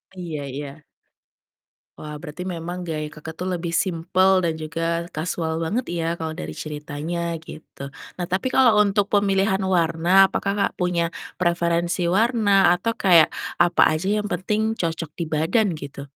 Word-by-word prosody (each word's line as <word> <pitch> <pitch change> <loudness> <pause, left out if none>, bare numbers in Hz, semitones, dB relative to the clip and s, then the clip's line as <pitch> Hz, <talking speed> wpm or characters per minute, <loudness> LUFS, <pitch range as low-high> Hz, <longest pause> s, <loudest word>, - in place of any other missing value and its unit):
Iya 165 -5 -5
iya. 140 +2 -7 1.1
Wah 150 0 -8
berarti 175 +3 -7
memang 175 0 -5
gaya 155 -2 -3
Kakak 155 +1 -9
tuh 185 - -1
lebih 170 -1 -3
simple 185 +2 +2
dan 165 - +1
juga 165 +2 -3
kasual 160 0 -3
banget 180 +10 -1
ya 165 0 -1
kalau 160 -1 -4
dari 80 0 -5
ceritanya 155 - -4
gitu. 145 -3 -10 0.3
Nah 175 - -2
tapi 190 +7 0
kalau 240 -5 +5
untuk 200 0 +1
pemilihan 195 -1 +2
warna 175 +2 +4
apakah 195 - -1
Kak 200 -1 0
punya 175 -2 0 0.3
preferensi 170 0 +1
warna 205 0 +3
atau 230 +5 -1
kayak 170 -7 +5 0.2
apa 175 0 +3 0.2
aja 190 +4 -4
yang 210 - -5
penting 215 +5 -1
cocok 165 -2 -2
di 170 - -2
badan 165 +6 +1
gitu? 140 -2 -8
170 Hz, 150 wpm, -23 LUFS, 160-190 Hz, 1.1 s, kalau